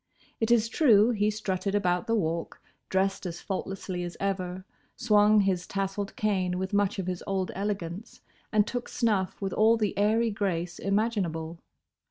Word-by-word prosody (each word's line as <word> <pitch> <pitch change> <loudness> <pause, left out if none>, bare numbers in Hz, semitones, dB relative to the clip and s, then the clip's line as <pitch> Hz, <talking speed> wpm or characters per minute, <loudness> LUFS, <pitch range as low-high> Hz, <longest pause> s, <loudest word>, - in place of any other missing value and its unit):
It 225 - 0
is 235 -2 +4
true 230 -4 +5
he 210 -2 +1
strutted 200 -2 -2
about 180 +1 +1
the 230 - +2
Walk, 165 -5 -2 0.3
dressed 190 0 0
as 170 -1 -6
faultlessly 190 -2 -4
as 175 0 -6
ever, 185 -1 -3 0.3
swung 210 -1 +4
his 185 -3 0
tassled 195 0 -3
cane 185 -4 0
with 190 +2 -3
much 205 0 +1
of 190 - -2
his 180 -1 -4
old 190 -2 -1
elegance, 195 +1 -4 0.3
and 210 -2 +4
took 245 +1 -4
snuff 210 -6 0
with 195 -2 -3
all 225 +2 +4
the 210 -3 -1
airy 220 +2 +3
grace 180 -4 -2
imaginable. 185 -6 -1
195 Hz, 160 wpm, -28 LUFS, 185-215 Hz, 0.3 s, true